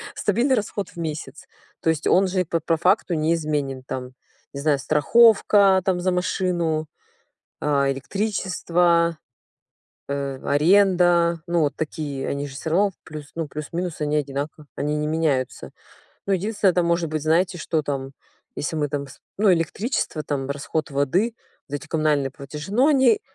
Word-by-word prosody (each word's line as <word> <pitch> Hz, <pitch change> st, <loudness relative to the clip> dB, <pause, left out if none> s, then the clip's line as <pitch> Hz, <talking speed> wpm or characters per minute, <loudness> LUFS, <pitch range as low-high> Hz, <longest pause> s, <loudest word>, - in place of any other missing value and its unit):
Стабильный 240 Hz, +6 st, +2 dB
расход 205 Hz, -3 st, -3 dB
в -, -, -19 dB
месяц. 155 Hz, -2 st, -5 dB, 0.4 s
То 160 Hz, -, +1 dB
есть 160 Hz, -1 st, 0 dB
он 190 Hz, +1 st, +4 dB
же 185 Hz, 0 st, 0 dB
по 165 Hz, +1 st, -1 dB
по 165 Hz, +1 st, 0 dB
факту 180 Hz, +2 st, +2 dB
неизменен. 150 Hz, -4 st, -1 dB
Там, 125 Hz, -1 st, -6 dB, 0.4 s
не 140 Hz, -, -5 dB
знаю, 150 Hz, -2 st, +2 dB
страховка, 200 Hz, -, +5 dB
там 185 Hz, -2 st, +1 dB
за 185 Hz, +1 st, 0 dB
машину, 175 Hz, -3 st, 0 dB, 0.7 s
а, 140 Hz, -2 st, +2 dB
электричество, 175 Hz, -1 st, 0 dB, 0.9 s
э, 140 Hz, -1 st, -3 dB
аренда, 175 Hz, +1 st, +4 dB
ну 170 Hz, -1 st, +1 dB
вот 145 Hz, -1 st, 0 dB
такие, 145 Hz, -3 st, -4 dB
они 140 Hz, 0 st, -2 dB
же 135 Hz, -, -10 dB
всё 160 Hz, +3 st, -4 dB
равно, 200 Hz, +3 st, +3 dB
плюс, 150 Hz, -2 st, -9 dB
ну, 165 Hz, -2 st, -3 dB
плюс-минус 160 Hz, +3 st, -5 dB
они 150 Hz, 0 st, 0 dB
одинаково, 145 Hz, +2 st, -4 dB
они 150 Hz, +1 st, -1 dB
не 150 Hz, -, -1 dB
меняются. 150 Hz, -5 st, -1 dB, 0.6 s
Ну, 200 Hz, -, +1 dB
единственное, 200 Hz, +1 st, +2 dB
это 180 Hz, -, +2 dB
может 170 Hz, -1 st, +1 dB
быть, 155 Hz, -1 st, -2 dB
знаете, 170 Hz, +3 st, +1 dB
что 160 Hz, -1 st, -1 dB
там, 135 Hz, -2 st, -4 dB, 0.4 s
если 155 Hz, +2 st, -3 dB
мы 150 Hz, -1 st, 0 dB
там 140 Hz, -1 st, -4 dB
сп -, -, -15 dB, 0.2 s
ну, 205 Hz, -2 st, +5 dB
электричество, 170 Hz, -, -1 dB
там, 135 Hz, -3 st, -3 dB
расход 145 Hz, +2 st, -3 dB
воды, 175 Hz, -, +1 dB, 0.3 s
вот 145 Hz, -, -6 dB
эти 145 Hz, +2 st, -10 dB
коммунальные 150 Hz, -4 st, +1 dB
платежи. 150 Hz, +6 st, -8 dB
Но 255 Hz, +6 st, +4 dB
они 265 Hz, -7 st, +4 dB
160 Hz, 155 wpm, -23 LUFS, 145-185 Hz, 0.9 s, страховка